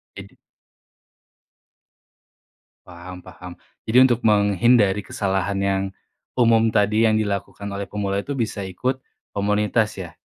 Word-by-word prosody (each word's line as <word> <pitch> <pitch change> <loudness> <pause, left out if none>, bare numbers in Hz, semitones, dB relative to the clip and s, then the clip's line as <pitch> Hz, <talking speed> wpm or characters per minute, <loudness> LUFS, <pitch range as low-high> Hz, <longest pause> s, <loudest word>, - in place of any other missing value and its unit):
Idi - - -12 2.5
Paham 90 +1 -11
paham 90 0 -11 0.3
jadi 125 +4 +6
untuk 120 -2 +3
menghindari 105 0 +3
kesalahan 95 -1 -2
yang 95 0 0 0.5
umum 115 -2 +4
tadi, 110 +1 +2
yang 110 - +2
dilakukan 100 -1 -3
oleh 100 0 -5
pemula 100 -1 -2
itu 140 +7 -5
bisa 110 -4 -3
ikut 125 +8 -2 0.3
komunitas 105 +2 0
ya. 85 -3 -7
105 Hz, 110 wpm, -22 LUFS, 95-110 Hz, 2.5 s, jadi